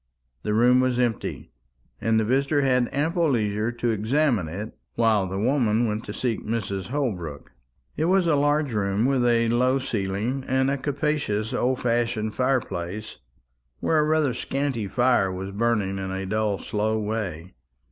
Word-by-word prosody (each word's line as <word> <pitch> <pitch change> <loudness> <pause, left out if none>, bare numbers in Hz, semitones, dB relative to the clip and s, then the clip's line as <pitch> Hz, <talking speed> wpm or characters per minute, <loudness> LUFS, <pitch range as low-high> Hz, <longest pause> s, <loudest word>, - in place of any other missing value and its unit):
The 105 - -1
room 125 +3 +5
was 130 -1 +1
empty, 120 - -2 0.5
and 110 0 +2
the - - +2
visitor 140 +4 +2
had 125 -2 +2
ample 165 +4 +1
leisure 110 -2 0
to 120 0 -1
examine 115 - +1
it 100 +7 -6 0.2
while 110 -4 +2
the 95 +1 -4
woman 115 0 +2
went 105 +1 -3
to - - -6
seek 120 -4 -2
Mrs. 100 -4 -3
Holbrook. 90 - -3 0.4
It 155 - 0
was 185 +1 +3
a 165 - +3
large 145 -1 +2
room 100 +1 +1
with 135 -2 +2
a 115 -1 +3
low 125 +3 +3
ceiling, 115 +1 -2
and 130 +1 +2
a 140 - 0
capacious 140 -7 -1
old 130 +1 0
fashioned 115 -2 0
fire 130 +3 +2
place, 100 +6 -6 0.6
where 160 - +2
a 150 - +2
rather 155 -4 +2
scanty 130 -3 -2
fire 120 -3 +2
was 95 +1 -5
burning 100 -3 0
in 95 0 -4
a 95 0 -3
dull 105 0 0
slow 110 +2 -1
way. 100 -5 -4
115 Hz, 165 wpm, -25 LUFS, 105-130 Hz, 0.6 s, room